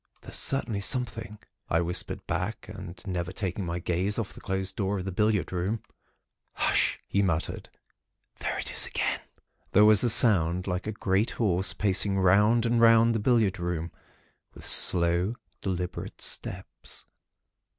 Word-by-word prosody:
"'There's -, -, -10 dB
certainly 120 Hz, -6 st, +1 dB
something,' 105 Hz, -2 st, -2 dB, 0.3 s
I 80 Hz, -, +2 dB
whispered 85 Hz, +1 st, -4 dB
back, -, -, -4 dB
and 85 Hz, 0 st, -9 dB
never 90 Hz, -2 st, -3 dB
taking 95 Hz, -1 st, -4 dB
my 85 Hz, +1 st, -3 dB
gaze 90 Hz, +4 st, -1 dB
off 115 Hz, -4 st, -4 dB
the -, -, -13 dB
closed 95 Hz, 0 st, -3 dB
door 100 Hz, 0 st, -1 dB
of 95 Hz, -, -5 dB
the 95 Hz, -, -3 dB
billiard 105 Hz, 0 st, 0 dB
room. 95 Hz, +5 st, -2 dB, 0.7 s
"'H'sh!' -, -, +1 dB
he 100 Hz, -, 0 dB
muttered, 85 Hz, -5 st, -2 dB, 0.7 s
'There -, -, -3 dB
it -, -, -3 dB
is -, -, +3 dB
again.' -, -, -2 dB, 0.5 s
"There 105 Hz, +2 st, +6 dB
was 105 Hz, -2 st, +6 dB
a 120 Hz, -, +2 dB
sound 90 Hz, -6 st, +4 dB
like 90 Hz, +1 st, -3 dB
a -, -, -1 dB
great 100 Hz, +1 st, 0 dB
horse 95 Hz, -4 st, +2 dB
pacing 100 Hz, 0 st, +1 dB
round 105 Hz, +5 st, +3 dB
and 115 Hz, 0 st, +1 dB
round 115 Hz, 0 st, +5 dB
the 110 Hz, -, -1 dB
billiard 105 Hz, -4 st, +1 dB
room, 85 Hz, -1 st, -3 dB, 0.6 s
with -, -, -10 dB
slow, 85 Hz, +5 st, +4 dB, 0.3 s
deliberate 90 Hz, -2 st, -4 dB
steps. -, -, -6 dB
95 Hz, 150 wpm, -27 LUFS, 90-110 Hz, 0.7 s, There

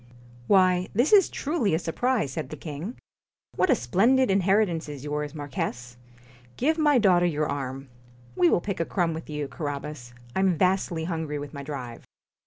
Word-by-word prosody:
'Why, 185 Hz, -2 st, +4 dB
this 250 Hz, -, +3 dB
is 395 Hz, -4 st, +7 dB
truly 275 Hz, -, 0 dB
a -, -, +2 dB
surprise,' 175 Hz, -, -1 dB
said 130 Hz, -, -5 dB
the 155 Hz, -, -7 dB
king. 160 Hz, -, -6 dB, 0.6 s
'What 370 Hz, -, +2 dB
a 265 Hz, -, +6 dB
splendid 225 Hz, -, +3 dB
inheritance 190 Hz, -4 st, +2 dB
is 145 Hz, -3 st, -7 dB
yours, 150 Hz, 0 st, -3 dB
Marquis! 145 Hz, -5 st, -3 dB, 0.8 s
Give 315 Hz, +5 st, +1 dB
my 295 Hz, -3 st, +4 dB
daughter 180 Hz, -6 st, +4 dB
your 155 Hz, -2 st, 0 dB
arm. 135 Hz, -1 st, -4 dB, 0.5 s
We 175 Hz, -1 st, +4 dB
will -, -, +2 dB
pick 200 Hz, 0 st, -4 dB
a 165 Hz, -, +1 dB
crumb 175 Hz, -3 st, 0 dB
with 160 Hz, 0 st, -7 dB
you, 150 Hz, -1 st, -3 dB
Carabas. 140 Hz, -3 st, -6 dB, 0.2 s
I -, -, +1 dB
'm 190 Hz, -3 st, +2 dB
vastly 180 Hz, -3 st, +1 dB
hungry 160 Hz, -3 st, -3 dB
with 145 Hz, 0 st, -7 dB
my 140 Hz, -, -6 dB
drive.' 135 Hz, -5 st, -7 dB
165 Hz, 175 wpm, -26 LUFS, 145-200 Hz, 0.8 s, is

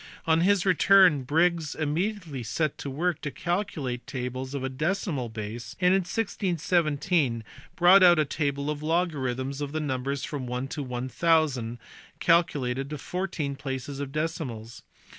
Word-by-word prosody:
On 160 Hz, 0 st, +3 dB
his 195 Hz, +1 st, +3 dB
return 185 Hz, -4 st, +5 dB
Briggs 165 Hz, +1 st, +1 dB
im 150 Hz, -1 st, -1 dB
mediately^setTp^ 155 Hz, -, -2 dB
work 160 Hz, +4 st, -1 dB
to 145 Hz, -, -3 dB
calculate 165 Hz, -8 st, -3 dB
tables 130 Hz, +1 st, -4 dB
to 135 Hz, -2 st, -3 dB
a -, -, 0 dB
decimal 150 Hz, -, -2 dB
base, 110 Hz, +1 st, -6 dB
and 180 Hz, 0 st, +4 dB
in 195 Hz, -, +4 dB
1617 175 Hz, -, 0 dB
he 115 Hz, -, -7 dB, 0.3 s
brought 180 Hz, +3 st, +7 dB
out 175 Hz, -2 st, +7 dB
a 155 Hz, -, +3 dB
table 140 Hz, 0 st, -1 dB
of 150 Hz, -, -4 dB
logarrthnis 140 Hz, -5 st, -1 dB
ofThenumbers 140 Hz, -2 st, -2 dB
from 135 Hz, -4 st, -5 dB
1 125 Hz, +2 st, -3 dB
to 150 Hz, -, -4 dB
1000 130 Hz, -1 st, 0 dB, 0.4 s
calculated 140 Hz, -6 st, +2 dB
to 150 Hz, -, -4 dB
fourteen 165 Hz, -3 st, -3 dB
places 135 Hz, 0 st, -5 dB
of"" 140 Hz, -1 st, -4 dB
decimals. 140 Hz, -8 st, -4 dB
150 Hz, 140 wpm, -27 LUFS, 130-170 Hz, 0.4 s, brought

